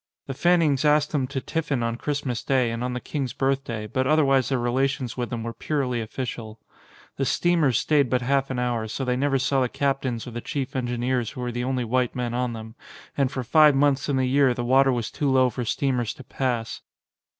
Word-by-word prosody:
The 135 - -5
Fannings 160 -3 +2
asked 150 0 +3
them 135 -4 0
to 135 +1 -3
tiffin 145 -3 -2
on 115 0 -1
Christmas 140 -2 -3
day 130 -4 +1
and 115 +1 -3
on 125 0 -2
the 125 - -3
King's 135 -1 -4
Birthday; 135 -5 -1
but 130 +5 -1
otherwise 135 -4 +3
their 135 - +1
relations 125 0 -1
with 120 -3 -3
them 115 0 -4
were 115 0 -4
purely 130 -5 -2
official. 115 -1 -6 0.6
The 135 - 0
steamers 160 -6 +2
stayed 145 -4 +2
but 125 -1 +1
half 135 +1 +1
an 130 - -3
hour, 120 -3 -1
so 130 +5 -4
they 125 0 +1
never 135 +1 +1
saw 135 +1 +1
the 125 - +1
captains 135 -4 -1
or 125 - -7
the 120 +1 -5
chief 135 -2 -4
engineers 120 -1 -1
who 125 - -8
were 125 0 -2
the 120 +1 -3
only 130 -1 -1
white 125 +1 0
men 120 -2 -2
on 125 -1 -1
them, 110 0 -8 0.4
and 135 -2 +1
for 130 -3 -3
five 150 +3 +5
months 140 0 +2
in 140 - +1
the 130 - +2
year 130 -1 +3
the 120 - -3
water 135 +2 +4
was 120 -3 -2
too 145 - -1
low 130 -1 +3
for 120 +1 -4
steamers 125 -1 -1
to 135 - -11
pass. 120 -4 -3
130 Hz, 220 wpm, -24 LUFS, 120-140 Hz, 0.6 s, five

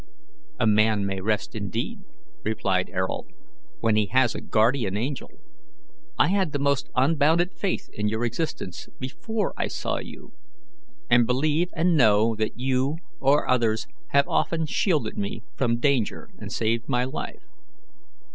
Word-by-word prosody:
"A - - +2
man 110 -1 +3
may 95 -1 -2
rest 105 - -1
indeed," - - -3 0.4
replied 95 -4 0
Ayrault, 95 -8 -2 0.5
"when 110 -1 +3
he 105 -1 +2
has 130 +1 +3
a - - -5
guardian 110 -3 +2
angel. 130 +5 -3 0.9
I - - +4
had 190 -5 +1
the - - +1
most 140 -1 0
unbounded 160 +6 +3
faith 195 -3 -2
in 105 0 -1
your 110 +3 0
existence 120 - -4
before 205 - -3
I - - 0
saw - - -2
you, - - -10 0.7
and 120 -1 +5
believe 150 +7 +1
and 170 +1 +3
know 110 -4 +5
that 110 +1 -2
you 130 +3 +1 0.2
or 140 +2 +3
others 115 -3 +2 0.2
have 140 0 +3
often 165 -1 +1
shielded 150 - 0
me 100 +2 -4
from 120 -2 +1
danger 130 -4 0
and - - -7
saved 115 +3 -1
my 125 -2 +2
life. 130 - -5
125 Hz, 145 wpm, -25 LUFS, 110-145 Hz, 0.9 s, and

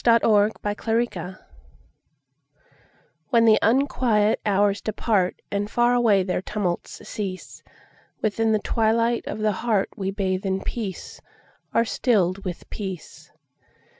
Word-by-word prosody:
The 230 -1 +4
Hour 205 -2 +5
of 215 - -6
Twilight 210 -6 -2 1.9
WHEN 230 -1 +4
the 220 -1 +6
unquiet 230 -3 +2
hours 200 0 +2
departAnd 205 -1 -1
far 240 +2 +2
away 225 -6 +3
their 180 -1 -2
tumults 190 -3 -4
cease, 190 -3 -6 0.6
Within 220 +1 0
the 215 - +3
twilight 230 +2 +1
of - - -4
the 215 0 +1
heartWe 195 -3 -1
bathe 190 -1 -1
in 190 0 -1
peace, 205 -6 -6 0.5
are 230 - +2
stilled 200 -6 +1
with 180 -3 -6
peace. 190 -5 -7
210 Hz, 115 wpm, -24 LUFS, 195-230 Hz, 1.9 s, the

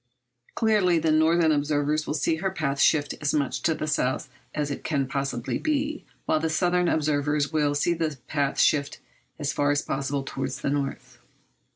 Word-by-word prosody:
Clearly 210 -6 +3
the 160 -1 +1
northern 160 +1 +4
observers 150 +1 0
will 150 - -1
see 160 +2 +1
her 190 +4 -1
path 145 -7 -2
shifted 145 0 +2
as 150 0 +1
much 140 -3 -1
to 160 - +1
the 155 - -3
south 130 -4 -1 0.3
as 145 -1 -1
it - - -5
can 140 -4 0
possibly 135 -3 -2
be, 300 0 -1 0.2
while 155 - +2
the 160 +1 -1
southern 180 +2 +2
observers 150 -1 +1
will 145 -2 +2
see 170 +4 +2
the 160 -4 -2
path 140 -2 -1
shifted 145 -2 +2 0.4
as 145 -2 -2
far 145 0 +1
as 145 0 +1
possible 140 0 -2
towards 135 -1 -4
the 140 - -1
north. 140 -1 -4
150 Hz, 180 wpm, -26 LUFS, 140-160 Hz, 0.4 s, northern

